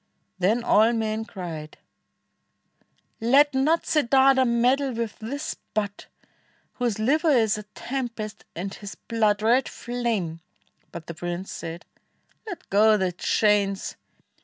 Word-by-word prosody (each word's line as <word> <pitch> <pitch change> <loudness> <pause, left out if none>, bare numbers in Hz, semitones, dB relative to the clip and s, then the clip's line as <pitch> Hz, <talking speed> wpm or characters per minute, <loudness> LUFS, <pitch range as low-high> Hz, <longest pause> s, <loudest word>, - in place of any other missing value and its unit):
Then 215 +6 +2
all 225 +1 +4
men 220 -1 -1
cried, 165 -8 -7 1.4
"Let 275 +6 +4
not 295 +5 +2
Siddartha 270 -2 +4
meddle 250 +3 +2
with 230 -2 -4
this 280 +8 -4 0.2
Bhut, 205 -1 -2 0.7
Whose 240 -4 0
liver 300 +9 +2
is 225 -7 +3
a - - -8
tempest, 235 -5 -5
and 195 +4 -4
his 205 -1 -8
blood 215 -3 0
Red 245 +4 +3
flame"; 230 -9 -3 0.5
but 170 -2 -8
the 170 - -6
prince 175 +3 -5
said, 165 +1 -7 0.6
"Let 360 - -7
go 215 +2 +5
the 190 -2 0
chains. 200 +2 +1
220 Hz, 120 wpm, -25 LUFS, 200-255 Hz, 1.4 s, go